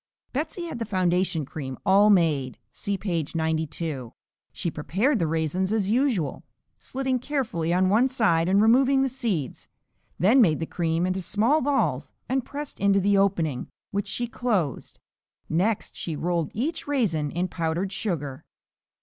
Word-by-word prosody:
Betsey 310 +6 -3
had 330 - -6
the 230 - -2
foundation 180 -4 +1
cream 135 -2 -6
all 200 +2 +6
made 155 -9 +2
(see 200 -1 -3
page 170 -6 -3
92). 160 -5 -2 0.4
She 170 - -3
prepared 200 - 0
the 165 - +1
raisins 165 +4 -1
as 210 -2 +1
usual 235 - +1 0.3
(slitting 260 -1 -2
carefully 230 - -2
on 185 +1 +3
one 220 +7 +4
side 190 -10 +2
and 200 +2 +4
removing 265 +4 +4
the 270 - +1
seeds), 220 - -3 0.5
then 225 - +5
made 160 -9 +4
the 165 - -2
cream 165 0 -1
into 185 +1 -1
small 230 - +2
balls 280 0 0
and 265 0 0
pressed 290 +3 -7
into 200 0 +3
the 200 +1 +2
opening, 175 -9 +1 0.2
which 205 0 -2
she 240 - -1
closed. 215 - -2 0.5
Next 195 +7 0
she 165 - -4
rolled 170 -1 -1
each 290 +10 -2
raisin 195 - 0
in 175 +5 -1
powdered 170 +2 -2
sugar. 150 -10 -3
190 Hz, 150 wpm, -25 LUFS, 165-235 Hz, 0.5 s, all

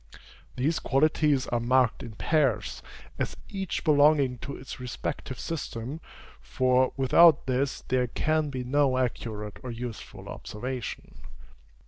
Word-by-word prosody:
These 145 +6 0
qualities 150 -1 +2
are 120 - +1
marked 125 0 +2
in 115 - -8
pairs, 130 -3 0 0.4
as - - -2
each 195 -2 -3
belonging 145 -4 +4
to 140 - -6
its 130 -2 -9
respective 125 0 -5
system; 145 -2 -5 0.4
for, 130 0 +2
without 145 +4 +6
this, 130 +1 -1
there 125 -1 +1
can 155 +4 0
be 130 -2 -4
no 135 0 +2
accurate 110 -4 -3
or 130 - -7
useful 120 -1 -7
observation. 125 +2 -6
130 Hz, 120 wpm, -27 LUFS, 125-145 Hz, 0.4 s, without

